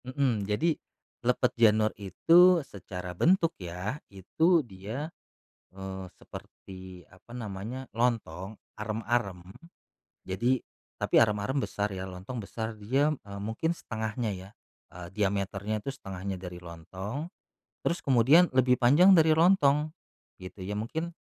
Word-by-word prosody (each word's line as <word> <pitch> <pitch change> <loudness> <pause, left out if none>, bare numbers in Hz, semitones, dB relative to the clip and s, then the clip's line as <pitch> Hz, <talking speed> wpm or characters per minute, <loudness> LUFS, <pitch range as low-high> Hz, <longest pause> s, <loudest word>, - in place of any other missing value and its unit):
Mhm. 130 -6 0
Jadi, 155 +11 +2 0.5
lepet 125 +1 +1
janur 110 -2 +4
itu 170 - +5
secara 90 -3 -7
bentuk 165 - +3
ya, 90 - -5
itu 160 - +2
dia, 115 - -6 0.6
eee, 95 0 -7
seperti, 95 -2 -11
apa 90 +5 -22
namanya, 115 +3 -6
lontong, 110 -5 -1 0.2
arem-arem. 110 -4 -2 0.8
Jadi 120 +7 +1 0.4
tapi - - +3
arem-arem 105 +3 +2
besar 105 -6 -2
ya, 95 -1 -5
lontong 95 +7 -7
besar, 110 +1 -5
dia, 135 +8 +2
eee, 100 -4 -10
mungkin 110 +10 -1
1/2-nya 110 -4 -3
ya, 95 +1 -11 0.4
eee, 90 -1 -8
diameternya 100 +1 -1
itu 135 - -3
1/2-nya 95 -7 -6
dari 90 -1 -8
lontong. 95 - -6 0.6
Terus, 170 - -1
kemudian 140 +7 +5
lebih 125 -1 +4
panjang 160 +11 +6
dari 160 -1 +5
lontong, 155 -3 +4 0.5
gitu, 95 +1 -10
ya. 100 +3 -4
Mungkin, 160 +11 -3
110 Hz, 120 wpm, -29 LUFS, 95-135 Hz, 0.8 s, panjang